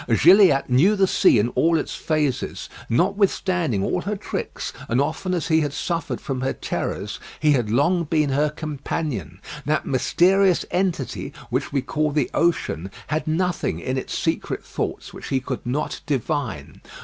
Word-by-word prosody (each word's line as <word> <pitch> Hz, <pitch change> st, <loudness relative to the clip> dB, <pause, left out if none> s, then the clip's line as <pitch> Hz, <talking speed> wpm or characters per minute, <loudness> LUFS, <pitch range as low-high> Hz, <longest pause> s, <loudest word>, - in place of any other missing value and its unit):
Gilliatt 165 Hz, -, +6 dB
knew 150 Hz, +12 st, +4 dB
the 195 Hz, -1 st, +4 dB
sea 185 Hz, -, +4 dB
in 105 Hz, +3 st, +2 dB
all 165 Hz, +5 st, +2 dB
its -, -, -3 dB
phases. 150 Hz, -4 st, -2 dB, 0.2 s
Notwithstanding 180 Hz, -, +1 dB
all 180 Hz, -, 0 dB
her 205 Hz, +3 st, -2 dB
tricks, 195 Hz, -, -5 dB, 0.2 s
and 115 Hz, +3 st, +2 dB
often 160 Hz, +6 st, -1 dB
as 175 Hz, -, -2 dB
he 160 Hz, 0 st, +4 dB
had 145 Hz, -2 st, -2 dB
suffered 170 Hz, 0 st, -2 dB
from 130 Hz, -3 st, -4 dB
her 130 Hz, -, 0 dB
terrors, 100 Hz, +3 st, -4 dB, 0.2 s
he 150 Hz, -1 st, +3 dB
had 120 Hz, -7 st, +1 dB
long 165 Hz, +9 st, +2 dB
been 155 Hz, -2 st, +1 dB
her 145 Hz, +3 st, +2 dB
companion. 140 Hz, -, -4 dB, 0.3 s
That 155 Hz, +1 st, +1 dB
mysterious 185 Hz, +7 st, +3 dB
entity 180 Hz, -7 st, -1 dB, 0.2 s
which -, -, -1 dB
we 135 Hz, -2 st, 0 dB
call 155 Hz, +3 st, 0 dB
the 145 Hz, -3 st, 0 dB
ocean 150 Hz, -, 0 dB, 0.2 s
had 155 Hz, +1 st, -1 dB
nothing 165 Hz, -, 0 dB
in 130 Hz, +9 st, -2 dB
its 130 Hz, -, -3 dB
secret -, -, -2 dB
thoughts -, -, -4 dB
which -, -, -8 dB
he 135 Hz, -, +1 dB
could 130 Hz, -1 st, -5 dB
not 135 Hz, +5 st, -2 dB
divine. 140 Hz, -, -3 dB
150 Hz, 160 wpm, -23 LUFS, 130-175 Hz, 0.3 s, Gilliatt